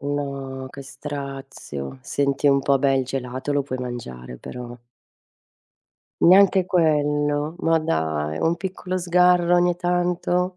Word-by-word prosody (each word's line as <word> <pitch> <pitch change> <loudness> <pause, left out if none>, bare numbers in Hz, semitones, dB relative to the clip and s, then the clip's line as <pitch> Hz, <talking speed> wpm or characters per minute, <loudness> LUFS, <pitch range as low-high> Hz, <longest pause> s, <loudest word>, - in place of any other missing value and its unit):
No, 140 -2 -4
che 140 +1 -10
strazio, 135 - -7
senti 140 0 0
un 140 0 +4
po', 140 0 +3
beh, 135 0 +2
il 130 - 0
gelato, 130 +2 -4
lo 145 - +1
puoi 130 -2 -5
mangiare 65 - -7
però. 120 - -8 1.4
Neanche 190 +1 +6
quello, 150 -3 +1
ma 165 -2 +2
dai, 80 - -1
un 165 +1 +1
piccolo 185 0 -4
sgarro 180 0 +3
ogni 175 0 +3
tanto? 180 +1 0
145 Hz, 125 wpm, -23 LUFS, 130-175 Hz, 1.4 s, Neanche